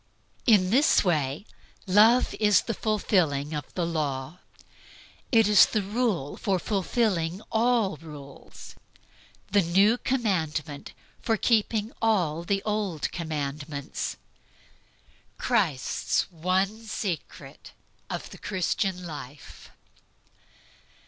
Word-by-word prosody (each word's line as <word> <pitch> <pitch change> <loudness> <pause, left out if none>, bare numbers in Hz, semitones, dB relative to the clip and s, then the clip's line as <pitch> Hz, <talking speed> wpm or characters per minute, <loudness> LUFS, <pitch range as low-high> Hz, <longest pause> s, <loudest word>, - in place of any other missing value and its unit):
In 195 -5 +5
this 280 +7 +4
way 150 -2 0 0.4
"Love 220 +6 +5
is 210 -2 +4
the 230 - -3
fulfilling 170 -10 0
of 150 -1 -5
the 175 - 0
law." 150 -1 -3 0.9
It 225 -4 +5
is 210 -1 +7
the 215 - -1
rule 205 - -1
for 195 -4 0
fulfilling 190 -3 -1
all 225 -6 +2
rules, 145 -3 -12 0.8
the 205 0 +4
new 195 +7 +3
commandment 160 - -2 0.3
for 225 -2 0
keeping 220 0 +1
all 180 -8 +1
the 195 +2 -1
old 210 -7 -2
commandments, 145 -3 -4 1.2
Christ's 185 - 0
one 190 +6 -1
SECRET 195 -5 -6 0.4
OF - - -5
THE - - -11
CHRISTIAN 185 -1 -2
LIFE. 150 -3 -10
185 Hz, 95 wpm, -26 LUFS, 155-215 Hz, 1.2 s, is